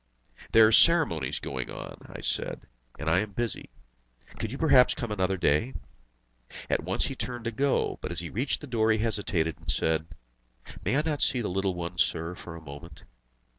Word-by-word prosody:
"There 110 -1 +8
are 110 - +4
ceremonies 125 - +5
going 65 -3 -4
on," - - -7
I - - -8
said, - - -2 0.4
"and 80 - -6
I 85 +3 +4
am 105 0 -3
busy. 120 +1 -3 0.7
Could 110 - -3
you 135 - -5
perhaps 135 -6 +5
come 120 -3 -4
another 95 -2 0
day?" 85 - +1 1.0
At - - +2
once - - 0
he 135 - -3
turned 120 -2 -5
to 115 - -1
go; 135 +4 0
but - - -4
as 85 - -5
he 85 -2 -6
reached 130 +6 -1
the - - -7
door 115 -3 +1
he 110 - +3
hesitated, 100 -8 0
and - - -12
said: 80 0 0 0.8
"May 135 - +1
I 150 - +2
not 155 -2 -1
see 130 -2 +2
the 110 - -2
little 95 0 -1
one, 85 0 -5
sir, 85 +1 +1
for 85 -2 -9
a 85 - -9
moment?" 75 +1 -11
100 Hz, 195 wpm, -28 LUFS, 85-120 Hz, 1.0 s, There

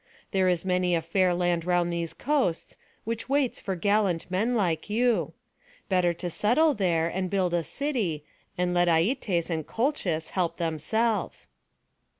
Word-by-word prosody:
There 190 -2 +2
is 175 0 0
many 180 -1 +1
a 165 - 0
fair 185 +2 +2
land 175 -1 0
round 175 0 +1
these 170 -1 -3
coasts, 270 - -1 0.3
which 225 +2 -4
waits 275 -3 +1
for 190 - -3
gallant 195 -2 +1
men 220 +7 +1
like 175 -5 0
you. 235 +2 +1 0.6
Better 180 -2 +3
to 175 +1 -5
settle 290 - +3
there, 170 -7 +1
and 185 +2 -2
build 185 -3 0
a 170 -1 +1
city, 210 - -2 0.3
and 180 0 0
let 175 0 +3
Aietes 175 0 +1
and 160 -1 -1
Colchis 195 - -1
help 180 -3 -1
themselves." 205 +8 -1
180 Hz, 155 wpm, -27 LUFS, 170-220 Hz, 0.6 s, Better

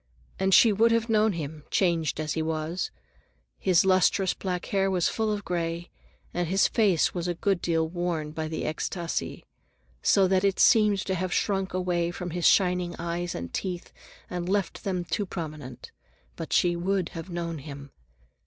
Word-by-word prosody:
And 190 0 +1
she 220 +3 +7
would 225 +3 +4
have 230 0 +1
known 215 -1 +3
him, 155 -2 -6
changed 165 -6 +1
as 155 -1 -2
he 160 - -1
was. 160 +2 -2 0.7
His 185 -1 +3
lustrous 185 0 +3
black 180 -2 -4
hair 195 -1 +1
was 180 -3 +2
full 220 -1 -1
of 205 -1 -3
gray, 170 0 -3 0.4
and 175 -1 -1
his 190 +3 +3
face 200 -8 +2
was 175 -1 -3
a 175 - -1
good 190 +1 0
deal 165 -1 +1
worn 170 -3 -3
by 155 0 -4
the 160 - -4
extasi, 170 +2 -3 0.6
so 195 -1 +4
that 185 0 +2
it 195 -1 +1
seemed 210 -2 +5
to 190 - -1
have 185 0 -2
shrunk 195 -2 0
away 175 -2 0
from 175 0 -5
his 175 0 +2
shining 180 -2 +3
eyes 170 +1 -3
and 85 0 -6
teeth 180 -3 -4 0.3
and 175 0 -4
left 200 -2 -1
them 180 -3 -2
too 200 +4 -2
prominent. 150 -8 -7 0.4
But - - -7
she 175 -1 +3
would 185 +1 -1
have 165 +3 -8
known 170 -2 -4
him. 140 -1 -9
175 Hz, 175 wpm, -27 LUFS, 165-190 Hz, 0.7 s, she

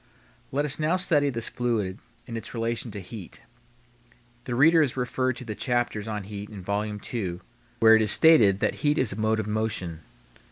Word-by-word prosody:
Let 145 +2 0
us 150 +1 +2
now 155 +3 +1
study 155 -6 +2
this 115 -3 -2
fluid 110 -6 -2 0.3
in 115 - -7
its 115 +2 -7
relation 115 +1 -2
to 105 -1 -7
heat. 95 -1 -10 1.0
The 120 - -3
reader 160 +6 +5
is 135 -4 0
referred 130 0 -1
to 125 - -9
the 110 - -4
chapters 120 -2 -2
on 105 -2 -4
heat 100 +1 -8
in 100 -4 -9
Vol. 105 +2 -2 0.2
II., 90 -7 -3 0.4
where 110 0 +8
it 110 - +3
is 105 -1 +2
stated 110 - +6
that - - 0
heat 150 0 +2
is 120 -9 +3
a - - -7
mode 110 +1 0
of 110 - -2
motion. 105 -6 -2
115 Hz, 195 wpm, -26 LUFS, 105-130 Hz, 1.0 s, where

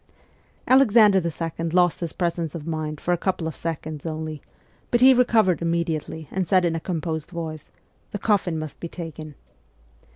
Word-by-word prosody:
Alexander 220 -7 +6
II. 165 0 -3
lost 175 0 +3
his 170 -2 -4
presence 170 -3 -2
of 155 -3 -6
mind 155 -2 -3
for 180 - 0
a 175 - -1
couple 180 -4 -1
of 160 - -5
seconds 155 -2 -5
only, 155 -2 -5 0.5
but 240 - +2
he 260 +2 +8
recovered 225 -8 +3
immediately 165 -2 -2
and 185 -2 -1
said 185 +1 +3
in 165 -1 0
a - - -1
composed 160 -2 -3
voice: 160 -3 -6 0.2
' - - -39
The - - -3
coffin 195 -5 +1
must 155 -1 -6
be 170 - -5
taken 155 -4 -8
170 Hz, 170 wpm, -24 LUFS, 160-185 Hz, 0.5 s, he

